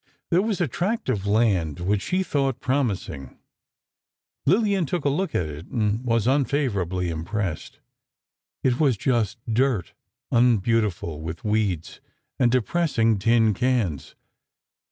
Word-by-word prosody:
There 175 +2 +4
was 210 -2 -1
a 175 - +1
tract 190 - -2
of 100 -5 -1
land 100 -9 +1
which 95 +3 0
she 185 +1 0
thought 135 -6 -1
promising. 110 - -2 1.1
Lillian 195 -1 +3
took 175 -2 -2
a - - +4
look 185 +7 -1
at 90 - +1
it, 75 +2 -8
and 110 +1 -1
was 115 -3 +1
unfavorably 110 - 0
impressed. 85 +1 -4 0.9
It 125 -1 +2
was 135 -8 +3
just 115 -3 0
dirt—unbeautiful 115 - 0
with 80 +1 -6
weeds, 105 -6 -1 0.4
and 120 -2 +4
depressing 120 - +1
tin 115 +1 +3
cans. 110 - -1
115 Hz, 120 wpm, -24 LUFS, 95-135 Hz, 1.1 s, There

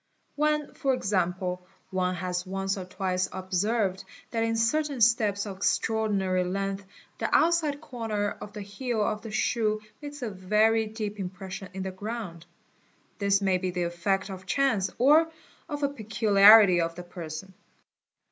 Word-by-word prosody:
When 300 0 0
for 270 -2 0
example 180 -3 -1 0.2
one 185 -1 0
has 180 -1 -2
once 195 +1 -2
or 190 -2 -6
twice 185 0 -2
observed 190 +1 -1 0.3
that 230 - -1
in 225 0 0
certain 280 +4 +1
steps 220 -3 +3
of 195 -2 -6
extraordinary 195 -3 +1
length 195 +2 -2 0.4
the - - -1
outside 315 -3 +2
corner 225 -8 -3
of 210 0 -7
the 210 0 -7
heel 220 +2 -2
of 210 0 -1
the 225 - -8
shoe 215 0 0 0.2
makes 290 -2 -7
a 225 - -2
very 215 +4 +2
deep 210 -1 -5
impression 190 0 -6
in 190 - -3
the 190 - -3
ground, 185 -4 -6 0.7
this 200 0 +2
may 190 -2 +2
be 185 0 -2
the 180 0 -2
effect 185 +3 -1
of 190 0 -9
chance 225 -7 +1
or 305 +6 +5 0.4
of 290 -1 -4
a 280 - +3
peculiarity 210 -5 +6
of 165 0 -2
the 180 - -7
person. 175 +1 -8
200 Hz, 155 wpm, -27 LUFS, 185-225 Hz, 0.7 s, peculiarity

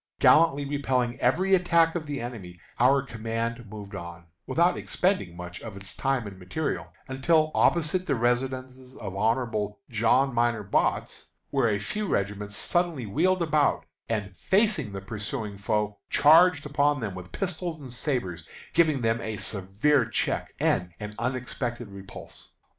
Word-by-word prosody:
Gallantly 150 -3 +5
repelling 130 -4 -1
every 180 +10 +2
attack 170 -3 +4
of 160 -3 -4
the 145 -2 -3
enemy, 100 -8 -7 0.2
our 135 +3 +5
command 115 -1 -4
moved 105 -1 -9
on, 85 -2 -8 0.2
without 170 +7 +3
expending 175 - -1
much 90 0 -8
of 110 -4 -8
its 100 -1 -8
time 135 -4 0
and 95 -2 -9
material, 140 +12 -3 0.2
until 155 +4 +2
opposite 170 +2 +2
the 140 - +2
residence 130 +1 -2
of 95 -4 -6
Hon. 110 -1 0 0.2
John 120 +4 +3
Minor 120 -2 +1
Botts, 100 - 0 0.2
where 115 - +2
a 105 - +1
few 205 - -3
regiments 100 - -2
suddenly 175 -8 0
wheeled 175 - +2
about, 150 - +2 0.2
and, 100 -4 -2
facing 190 - +1
the 95 -1 -6
pursuing 105 +2 -5
foe, 105 0 -1
charged 160 0 +6
upon 145 0 +2
them 105 -5 -3
with 90 -1 -9
pistols 180 -3 -3
and 130 -4 -9
sabres, 115 - -2 0.3
giving 155 -6 +3
them 115 0 +1
a 110 -1 -4
severe 105 +9 +1
check - - -2
and 90 -1 +1
an 105 0 -6
unexpected 120 -1 -3
repulse. 100 -1 -11
120 Hz, 145 wpm, -27 LUFS, 105-150 Hz, 0.3 s, charged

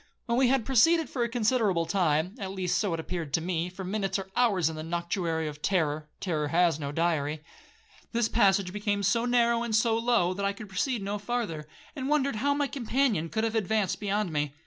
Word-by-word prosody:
When 235 +1 +1
we 265 - +5
had 255 -3 +2
proceeded 325 +6 +3
for 245 - -1
a 235 - -1
considerable 220 -7 +1
time, 165 -1 +1
(at 195 - -4
least 180 -2 0
so 205 -4 0
it - - -6
appeared 160 -2 -4
to - - +1
me, 170 0 -2
for 185 +1 -8
minutes 195 0 -1
are 190 -1 -7
hours 205 -9 +3
in 160 - -3
the 155 - -5
noctuary 170 -1 -2
of 150 0 -7
terror,—terror 155 -2 -1
has 165 -1 +2
no 140 -2 -4
diary), 155 -2 -1 0.7
this 235 -1 +1
passage 195 -5 +2
became 205 -1 -1
so 230 +5 +2
narrow 235 -1 +3
and 235 -2 -1
so 225 +1 +3
low, 230 -6 +2
that 200 +2 -4
I 200 0 +1
could 205 0 -10
proceed 210 +4 -1
no 205 +1 -3
farther, 205 -9 -3 0.3
and 270 -1 -3
wondered 280 -5 +1
how 285 +5 +1
my 290 0 +1
companion 245 - 0
could 220 +4 -1
have 225 -1 0
advanced 215 -2 0
beyond 205 -3 -1
me. 145 -1 -1
200 Hz, 210 wpm, -28 LUFS, 170-235 Hz, 0.7 s, we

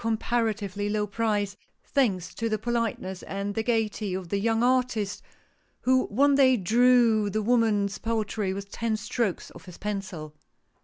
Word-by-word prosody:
comparatively 220 -3 -1
low 210 0 0
price, 205 -1 -1 0.3
thanks 195 -10 0
to 230 0 -2
the 215 - 0
politeness 220 -5 -2
and 200 +1 -4
the 225 - -1
gayety 220 -4 -1
of 185 -2 -6
the 200 - 0
young 225 +2 +1
artist, 245 -5 +1 0.6
who 260 0 +3
one 280 +7 +3
day 260 -2 +5
drew 230 +1 +4
the 215 +2 -1
woman's 210 -4 +2
portrait 215 -3 -2
with 200 0 -7
ten 230 -2 -1
strokes 215 -2 -2
of - - -14
his 180 -2 -11
pencil. 190 -7 -5
215 Hz, 150 wpm, -27 LUFS, 200-230 Hz, 0.6 s, day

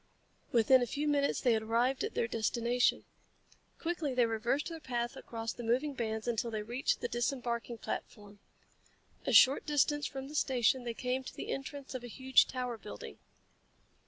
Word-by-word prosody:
Within 245 +2 +5
a 245 - 0
few 295 +5 -2
minutes 285 -1 +1
they 245 -3 +4
had 220 - +1
arrived 235 +4 +1
at - - -3
their - - +1
destination. 235 +2 +1 0.7
Quickly 325 -5 -2
they 245 -1 +4
reversed 235 +7 -1
their 330 -1 -6
path 240 -4 -3
across 225 -1 -5
the - - -8
moving 250 +6 0
bands 220 -3 -3
until 235 0 0
they 215 -2 -3
reached 240 +5 -1
the - - -1
disembarking 240 -1 -2
platform. 205 -2 -6 0.9
A - - +2
short 270 +2 +7
distance 295 0 +2
from 270 -1 -6
the 295 - -10
station 255 -3 +2
they 235 -1 -3
came 255 +2 -2
to - - -9
the - - -6
entrance 275 0 -5
of 255 -2 -5
a - - -6
huge 260 +3 +4
tower 250 -3 -4
building. - - -9
245 Hz, 175 wpm, -32 LUFS, 230-270 Hz, 0.9 s, short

